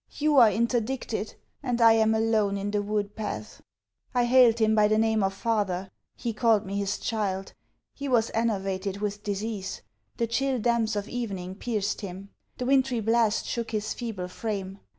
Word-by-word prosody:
You 300 -1 +2
are 235 -4 +8
interdicted! 235 -1 -1 0.3
and 250 -4 -1
I 230 -1 +7
am 220 0 +3
alone 220 -3 +1
in 200 +1 -3
the 205 0 +1
wood 205 0 -2
path! 215 -2 -5 0.5
I 245 -1 +3
hailed 240 -2 +6
him 220 -1 +3
by 210 -1 +5
the 215 +1 +2
name 220 -1 +2
of 195 0 +1
father. 195 -3 -1 0.2
He 235 -2 -3
called 220 -2 +3
me 195 +1 -4
his 200 -1 -1
child. 195 -4 -2 0.4
He 280 - -5
was 230 -3 +2
enervated 195 -3 -1
with 205 0 -3
disease. 205 -1 -4 0.3
The 235 - +1
chill 260 +3 0
damps 230 -1 +1
of 205 0 -2
evening 195 -7 -4
pierced 205 -1 -2
him. 195 0 -8 0.3
The 250 - -3
wintry 265 -2 +2
blast 225 0 +2
shook 235 -1 -3
his 215 -1 -2
feeble 220 -7 -5
frame. 195 0 -4
220 Hz, 170 wpm, -27 LUFS, 200-235 Hz, 0.5 s, are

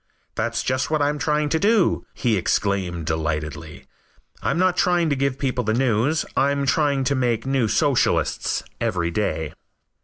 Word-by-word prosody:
"That's 115 +1 -2
just 130 0 -1
what 155 -1 +1
I'm 145 0 0
trying 150 -1 +1
to 160 - +1
do," 210 -1 +2
he 120 -4 +1
exclaimed 95 -3 -1
delightedly. 75 -1 -3 0.6
"I'm - - 0
not 185 0 +2
trying 175 -3 +2
to - - +2
give 140 0 0
the - - -20
people 130 -3 -1
the 110 0 0
news. 130 +5 +1
I'm 140 0 +1
trying 140 -1 +2
to 140 - +1
make 125 -4 0
new 135 -4 +1
Socialists - - +1 0.2
every 85 -1 -1
day." 80 -5 -2
130 Hz, 160 wpm, -22 LUFS, 105-150 Hz, 0.6 s, do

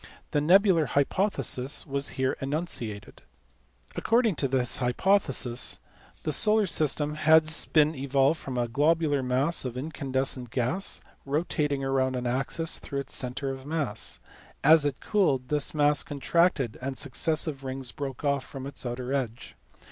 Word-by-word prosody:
The 145 - +1
nebular 175 -1 +4
hypothesis 140 -3 0
was 140 -1 -1
here 130 0 +1
enunciated*. 135 - -4 0.7
According 230 -4 +2
to 140 - 0
this 125 -2 0
hypothesis 130 -2 +1 0.5
the 155 - -1
solar 215 +6 +3
system 150 -3 0
has 155 0 +3
been 155 0 +3
evolved 140 +2 +1
from 130 -2 -6
a 120 -1 0
globular 145 +3 +2
mass 130 +6 0
of 125 -2 -5
incandescent 130 -3 -2
gas 130 - 0 0.2
rotating 145 -1 -1
round 130 -1 0
an 125 0 -3
axis 135 +6 -1
through 140 0 -4
its - - -6
centre 130 +2 -2
of 135 +1 -8
mass. 150 -8 -3 0.4
As 155 0 +6
it 140 -2 -2
cooled, 140 -12 +1
this 150 +1 0
mass 145 0 +4
contracted 145 -4 0
and 135 +1 -4
successive 150 +1 -1
rings 130 -1 -5
broke 135 -2 -6
off 140 -2 +1
from 135 -1 -8
its 140 -1 -6
outer 125 +2 -4
edge. 120 -4 -4
140 Hz, 140 wpm, -27 LUFS, 130-155 Hz, 0.7 s, As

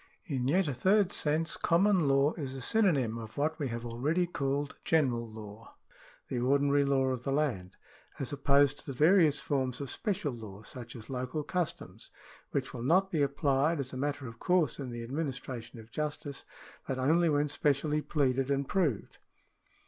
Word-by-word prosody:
— - - -42
In 125 -1 0
yet 180 +5 +3
a 145 - -1
third 195 - +3
sense 160 +2 0
common 180 -1 +3
law 140 +2 +3
is 135 -5 -5
a 135 - -6
synonym 135 - +2
of 110 +2 -9
what 155 +2 0
we 145 - -1
have 115 -1 -5
already 145 +10 0
called 140 -3 -2
general 125 -8 +1
law, 110 0 -11 0.5
the 125 - -2
ordinary 140 +3 +3
law 135 -1 +2
of 125 -2 -3
the 135 - -2
land, 120 -11 -1 0.4
as 135 0 -4
opposed 140 0 +3
to - - -10
the 135 - -3
various 155 -1 +5
forms 130 -3 -1
of 140 -2 -4
special 170 -9 -2
law, 105 -3 -9
such 120 +2 -8
as 110 -2 -9
local 130 +4 -3
customs, 175 +1 -4 0.4
which - - -2
will 120 - -6
not 185 +9 +3
be 155 - +1
applied 140 +2 +1
as 135 -1 -4
a - - -5
matter 140 +1 -2
of 115 -1 -9
course 180 -9 +2
in 135 -3 -4
the 120 -1 -5
administration 130 -3 -5
of 110 0 -14
justice, 145 0 -4 0.4
but 135 - -2
only 160 +6 +3
when 145 0 +2
specially 150 +1 +1
pleaded 135 -3 0
and 140 -1 0
proved. 155 - -1
140 Hz, 180 wpm, -31 LUFS, 125-155 Hz, 0.5 s, various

